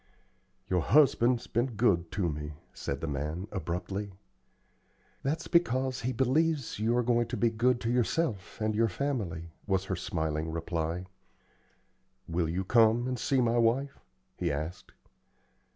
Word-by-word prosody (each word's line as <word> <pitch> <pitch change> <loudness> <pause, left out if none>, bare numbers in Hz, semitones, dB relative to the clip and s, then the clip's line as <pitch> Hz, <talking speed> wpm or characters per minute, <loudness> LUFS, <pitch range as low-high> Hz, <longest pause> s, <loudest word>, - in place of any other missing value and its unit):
"Your 90 -2 +1
husband's 125 - +4
been 120 +1 -1
good 90 -7 +2
to 95 -3 0
me," 75 -1 -4 0.2
said 70 0 -4
the 80 - -2
man, 75 +6 -3
abruptly. 95 +3 -3 1.1
"That's 145 +4 -2
because 130 -7 +2
he 125 +2 -1
believes 135 +1 +1
you 115 +3 +2
are 125 - +2
going 120 -1 +2
to 120 +1 -4
be 115 +2 +2
good 120 +2 +2
to 115 - 0
yourself 120 - 0
and 110 0 0
your 115 +1 +2
family," 90 - -3 0.2
was 95 -1 +1
her 95 - -2
smiling 80 -2 -2
reply. 85 +1 -2 1.2
"Will 85 -1 0
you 90 +3 -1
come 115 +3 +4
and 125 -1 -2
see 135 -2 +2
my 120 0 +2
wife?" 130 +5 +1 0.4
he - - 0
asked. 80 +5 -5
110 Hz, 145 wpm, -30 LUFS, 85-125 Hz, 1.2 s, husband's